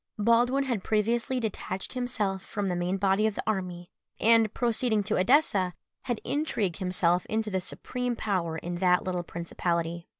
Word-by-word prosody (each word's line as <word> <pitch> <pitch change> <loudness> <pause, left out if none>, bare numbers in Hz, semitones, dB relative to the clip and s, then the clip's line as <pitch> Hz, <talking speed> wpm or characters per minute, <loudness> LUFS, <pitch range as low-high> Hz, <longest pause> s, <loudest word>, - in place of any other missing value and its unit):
Baldwin 240 +5 +3
had 240 -8 -2
previously 230 +4 +1
detached 195 -4 -4
himself 215 -7 -2
from 205 -3 -3
the 180 - -1
main 175 +2 -1
body 195 +2 +2
of 215 - -2
the - - -3
army, 180 -4 -3 0.3
and, 225 -1 +5
proceeding 235 -3 +1
to 215 +2 0
Edessa, 190 - +3 0.3
had 240 -3 -1
intrigued 225 - -1
himself 180 -2 +1
into 220 -1 -1
the 190 -1 0
supreme 250 +6 -3
power 180 -8 -1
in 175 +2 -4
that 180 0 +3
little 180 -1 -2
principality. 170 0 -3
200 Hz, 160 wpm, -28 LUFS, 180-230 Hz, 0.3 s, and